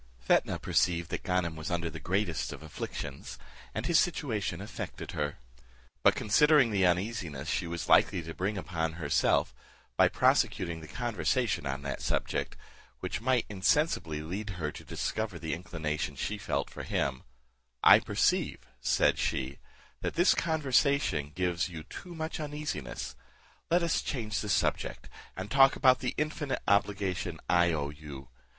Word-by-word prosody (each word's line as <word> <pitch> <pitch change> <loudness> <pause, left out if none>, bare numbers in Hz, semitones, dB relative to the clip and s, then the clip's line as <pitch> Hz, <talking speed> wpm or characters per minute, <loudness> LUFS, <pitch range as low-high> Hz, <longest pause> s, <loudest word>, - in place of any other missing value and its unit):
Fetnah - - +2
perceived 85 -2 +1
that - - -2
Ganem 90 -3 0
was 75 -1 -5
under 85 -1 -1
the 80 -1 -6
greatest 90 0 -1
of - - -9
afflictions, 70 -2 -6 0.4
and 110 - -2
his 170 +1 +4
situation 120 - -1
affected 105 +1 -6
her; 75 -1 -2 0.6
but - - +5
considering 140 +3 +4
the 95 -3 +3
uneasiness 90 -6 -1
she 85 - -1
was 85 -1 -4
likely 85 - +4
to 80 +1 -7
bring 100 +4 -2
upon 80 -3 -2
herself, 80 -4 +1 0.4
by - - +7
prosecuting 85 -2 +2
the 80 - -10
conversation 105 - -1
on 70 +1 -3
that 70 -1 -4
subject, - - -1 0.4
which 105 - -3
might 125 0 +2
insensibly 95 - +1
lead 100 +6 -4
her 75 -3 -2
to - - -10
discover - - -3
the 80 -2 -3
inclination 80 -2 -3
she 105 0 -3
felt - - -2
for - - -7
him; 65 -2 -1 0.6
"I - - +9
perceive," - - +1 0.2
said - - +2
she, 65 +1 -2 0.4
"that - - -3
this 175 +3 +5
conversetion 140 - +1
gives 90 0 0
you 80 -3 -7
too 175 - -9
much 160 0 -4
uneasiness; 150 - -4 0.5
let 175 +1 +3
us 170 - +1
change 110 -6 -2
the 105 - -4
subject, 95 - 0 0.3
and 95 +3 -5
talk 135 0 +6
of 130 -1 +7
the 125 - -2
infinite 150 -2 -2
obligation 95 -4 +1
I 85 -1 +4
owe 75 -2 -2
you. 75 -3 -10
90 Hz, 150 wpm, -30 LUFS, 80-120 Hz, 0.6 s, I